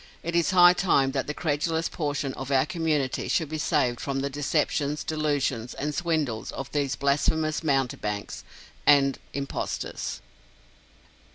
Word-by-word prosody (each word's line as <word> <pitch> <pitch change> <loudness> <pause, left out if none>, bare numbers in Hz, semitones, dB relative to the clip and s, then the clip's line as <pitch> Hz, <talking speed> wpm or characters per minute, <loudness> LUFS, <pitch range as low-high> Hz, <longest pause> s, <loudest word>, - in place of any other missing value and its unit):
It 170 +1 -3
is 170 -1 +3
high 180 -1 +7
time 140 -7 +2
that 135 -1 -2
the 150 - -2
credulous 160 +1 0
portion 145 -3 -2
of 135 0 -6
our 135 -1 +3
community 150 -5 -1
should 160 -4 0
be 155 0 -4
saved 120 -4 +1
from 135 -1 -2
the 140 0 -2
deceptions, 145 +1 0
delusions, 145 -6 -1
and 150 +2 -3
swindles 155 -9 -1
of 135 - -6
these 140 -2 0
blasphemous 150 +3 +1
mountebanks 125 -8 -1 0.4
and 140 -2 +5 0.2
impostors. 140 0 -4
145 Hz, 135 wpm, -26 LUFS, 135-155 Hz, 0.4 s, high